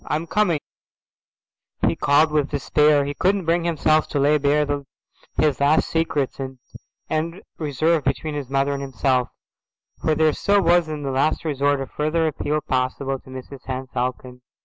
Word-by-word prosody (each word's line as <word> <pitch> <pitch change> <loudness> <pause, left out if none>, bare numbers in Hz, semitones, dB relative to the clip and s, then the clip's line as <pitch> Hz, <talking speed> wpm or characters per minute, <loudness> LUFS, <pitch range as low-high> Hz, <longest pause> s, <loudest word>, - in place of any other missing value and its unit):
"I'm 155 +2 -2
coming," 175 -4 +1 1.3
he - - +2
called 150 +2 +3
with 150 -2 +1
despair; 150 0 +3
he 145 - -3
couldn't 190 +4 +1
bring 170 +1 +1
himself 155 -2 +2
to 145 - -1
lay 150 +2 +3
bare 145 +1 +2 0.7
his 150 -3 +2
last 145 +3 +3
secrets 150 -5 -1
and 130 -1 -5 0.5
end 165 +4 -3 0.2
reserve 155 +1 +1
between 145 +3 -1
his 145 -3 -5
mother 135 +1 +1
and 140 - -4
himself, 130 -1 0 0.7
for 155 - +2
there 160 +1 +2
was 155 - +1
still 200 -3 +2
in 160 -4 +2
the 135 - -2
last 140 +5 0
resort 145 -2 +1
a - - -2
further 155 +4 -1
appeal 150 0 -1
possible 135 0 -1
to - - -18
Mrs 130 +1 -10
Henne 130 0 -4
Falcon. 125 0 -3
145 Hz, 165 wpm, -22 LUFS, 135-155 Hz, 1.3 s, called